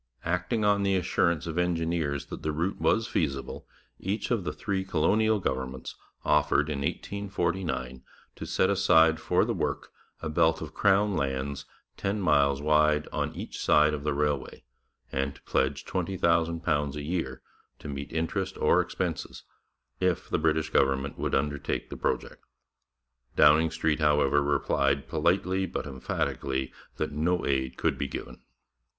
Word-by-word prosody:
Acting 90 +6 0
on 100 0 +3
the 100 -1 +2
assurance 85 -3 +1
of 85 +1 -2
engineers 85 -4 0
that - - -8
the 80 - -1
route 85 +6 -2
was 110 0 +2
feasible, 70 -5 -2 0.3
each 100 +4 -3
of 115 -6 +1
the 75 - -1
three 95 +6 -2
colonial 105 +6 +2
governments 65 -6 -3 0.3
offered 75 +1 +3
in 70 - -2
1849 85 -5 -2 0.3
to - - -7
set 95 - +2
aside 80 -5 +4
for - - +2
the - - -1
work - - -3 0.3
a 80 - -4
belt 75 - +2
of - - -7
crown 100 0 +3
lands 70 0 -2 0.3
ten 100 +2 -1
miles 70 -5 +3
wide 75 0 +3
on - - -1
each - - -6
side 75 0 +4
of 70 -2 -4
the 75 -1 0
railway, 75 -2 -1 0.5
and 70 +1 -1
to - - -17
pledge 65 +1 0
£20,000 85 -5 0
a 75 - -4
year 75 -5 -3 0.3
to - - -10
meet 70 -1 -5
interest 85 +4 -2
or - - +4
expenses, - - -4 0.6
if 90 -2 0
the - - +1
British 80 -1 +1
government 65 +1 +1
would - - 0
undertake 70 +1 -2
the - - -4
project. - - -3 0.9
Downing 75 +2 +6
Street, 80 -1 0
however, 75 -2 +3
replied 70 -1 +1
politely 90 +4 +1
but - - -4
emphatically 65 -1 -3 0.2
that 75 - -2
no 85 +4 0
aid 65 -2 -1
could - - 0
be 70 - -1
given. 65 -1 -7
80 Hz, 150 wpm, -28 LUFS, 70-90 Hz, 0.9 s, Downing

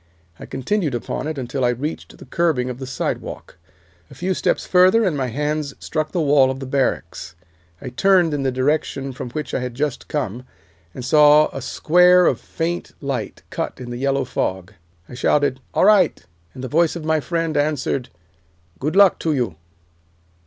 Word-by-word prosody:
I - - -9
continued 145 +2 -1
upon 120 - -4
it 155 -2 -4
until 130 +1 -3
I 120 - +3
reached 135 +6 -4
the - - -13
curbing 145 -8 0
of 125 - -8
the 130 - -6
sidewalk. 135 - -5 0.5
A - - -14
few 185 +2 -1
steps - - 0
further, 185 +5 +5
and 185 -7 +1
my 135 -2 -1
hands 150 +3 -2
struck 155 -1 -3
the 180 - -1
wall 140 -4 +4
of 130 0 -4
the 135 - -6
barracks. 135 -8 -2 0.4
I 130 - -7
turned 175 +4 +3
in 145 - -1
the 135 -1 0
direction 135 +1 -1
from 125 - -6
which 150 +3 -5
I - - 0
had 125 -1 -5
just 145 0 -3
come, 125 -5 -3 0.5
and 125 - -6
saw 150 +2 +6
a 135 - -7
square 180 +6 +4
of - - +2
faint 170 +1 -4
light 140 -3 -4
cut - - -4
in 125 -1 -7
the 120 - -5
yellow 135 +1 0
fog. 95 -5 -3 0.3
I - - -12
shouted 135 +1 +1
'All - - +2
right,' 200 -6 +4 0.3
and 130 - -8
the - - -3
voice 165 +4 +2
of 165 -2 -6
my 160 0 +2
friend 165 +1 -2
answered, 145 -3 -1 0.7
'Good 150 +6 -2
luck 200 -2 +6
to 160 -2 0
you. 120 - -1
145 Hz, 185 wpm, -21 LUFS, 130-160 Hz, 0.7 s, saw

